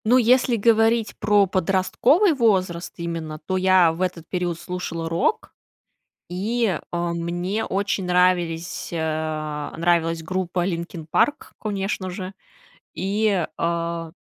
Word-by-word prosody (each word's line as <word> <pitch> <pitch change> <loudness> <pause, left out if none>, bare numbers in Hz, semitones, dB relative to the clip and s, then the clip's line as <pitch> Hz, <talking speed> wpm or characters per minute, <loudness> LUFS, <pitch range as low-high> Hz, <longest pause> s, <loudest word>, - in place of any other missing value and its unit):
Ну, 245 +4 +5
если 250 0 +4
говорить 225 0 +3
про 205 -1 +4
подростковый 195 - +2
возраст 185 - +1
именно, 165 -2 -4
то 185 - -1
я 185 -2 +5
в 165 +3 -7
этот 175 -3 -2
период 175 -2 -2
слушала 175 -2 -4
рок, 170 - -1 0.8
и, 205 +1 0
э, 175 - -2 0.2
мне 175 +5 -2
очень 195 -1 -1
нравились, 180 -2 +1
а, 155 -2 -3
нравилась 165 -1 +1
группа 180 0 -1
Linkin 170 -2 -4
Park, 295 +1 +1
конечно 195 -2 -3
же, 185 +1 -6 0.6
и, 200 -2 0
э 170 -1 -2
180 Hz, 120 wpm, -23 LUFS, 170-205 Hz, 0.8 s, Ну